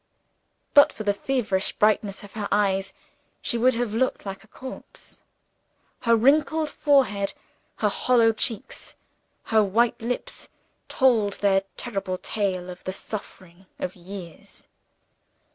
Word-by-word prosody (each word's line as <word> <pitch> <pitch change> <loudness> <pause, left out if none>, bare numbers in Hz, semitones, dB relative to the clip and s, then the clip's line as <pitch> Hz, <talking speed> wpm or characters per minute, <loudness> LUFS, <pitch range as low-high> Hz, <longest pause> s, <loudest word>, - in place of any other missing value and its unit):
But 285 -1 +8
for 215 - -7
the 205 -1 +2
feverish 215 -4 0
brightness 210 -2 +1
of 200 - -11
her 210 -1 -4
eyes, 195 -1 +1 0.5
she - - -2
would 245 +1 +3
have 235 -2 -1
looked 255 0 0
like 195 +1 -6
a - - -20
corpse. 260 +4 -10 0.8
Her 230 -1 +4
wrinkled 295 +6 +3
forehead, 230 -9 +2 0.4
her - - +1
hollow 230 -3 +3
cheeks, 220 -1 -2 0.5
her 220 -1 +3
white 225 +5 +1
lips 240 +2 -4 0.4
told 230 -7 +3
their 195 -1 +2 0.2
terrible 195 -6 -3
tale 185 -3 -2
of 180 - -12
the 185 - -3
suffering 190 -3 -8
of 180 - -4
years. 180 -2 -11
210 Hz, 125 wpm, -25 LUFS, 195-240 Hz, 0.8 s, But